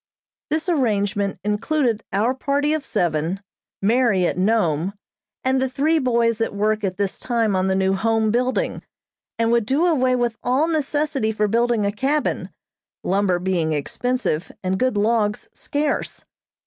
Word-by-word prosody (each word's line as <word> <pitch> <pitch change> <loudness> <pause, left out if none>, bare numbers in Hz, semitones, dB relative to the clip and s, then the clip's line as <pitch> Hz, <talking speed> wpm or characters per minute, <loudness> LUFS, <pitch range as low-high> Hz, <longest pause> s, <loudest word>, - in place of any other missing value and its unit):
This 315 +3 -1
arrangement 205 - 0
included 225 +2 0
our 215 +6 +1
party 285 +3 0
of 310 -2 -1
seven, 165 +2 -1 0.4
Mary 220 -4 +3
at - - 0
Nome, 185 -3 +1 0.5
and 260 0 +2
the 265 - 0
three 300 +5 +1
boys 235 -4 +1
at 225 - -1
work 215 +1 0
at 185 -2 -2
this 200 -1 -2
time 230 -4 0
on 185 0 +1
the 190 - +1
new 190 0 +2
Home 220 +2 +1
building, 255 - 0 0.6
and 230 0 +1
would 235 -3 +2
do 290 +6 +2
away 260 -7 +2
with 240 -2 -1
all 260 +6 +1
necessity 295 -6 0
for 210 -1 0
building 230 0 +1
a 200 - +1
cabin, 275 +8 -1 0.5
lumber 190 -1 +1
being 175 -3 0
expensive 180 - -2
and 190 +1 -1
good 255 -4 +1
logs 210 0 +1
scarce. 290 0 -3
225 Hz, 150 wpm, -22 LUFS, 200-260 Hz, 0.6 s, Mary